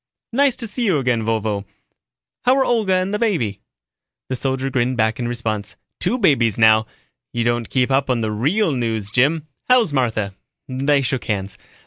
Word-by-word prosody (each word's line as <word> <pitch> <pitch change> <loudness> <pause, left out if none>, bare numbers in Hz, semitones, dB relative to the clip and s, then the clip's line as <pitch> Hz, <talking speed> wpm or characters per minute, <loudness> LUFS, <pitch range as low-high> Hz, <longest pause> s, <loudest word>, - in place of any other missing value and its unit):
"Nice 275 0 +3
to 235 - -4
see 235 +3 -2
you 185 -8 +3
again, 125 -4 +1
Vovo. 110 -2 -1 0.8
How're 265 +2 +4
Olga 215 -6 +2
and 185 +2 0
the 210 - 0
baby?" 125 - 0 0.7
The 130 - -1
soldier 135 +1 -2
grinned 125 0 0
back 110 0 +1
in 120 - -2
response. 110 -4 -3 0.2
"Two 250 - 0
babies 135 - +3
now 110 -1 +5 0.4
you 120 - -1
don't 120 -1 0
keep 130 0 +1
up 135 0 +2
on 125 -2 +1
the 110 -1 -1
real 155 - +1
news, 115 -5 -2
Jim. 145 +6 +2 0.2
How's 240 -10 +4
Martha?" 110 -7 0 0.3
They 140 +2 +1
shook 130 0 -2
hands. 100 -2 -3
125 Hz, 170 wpm, -20 LUFS, 110-165 Hz, 0.8 s, now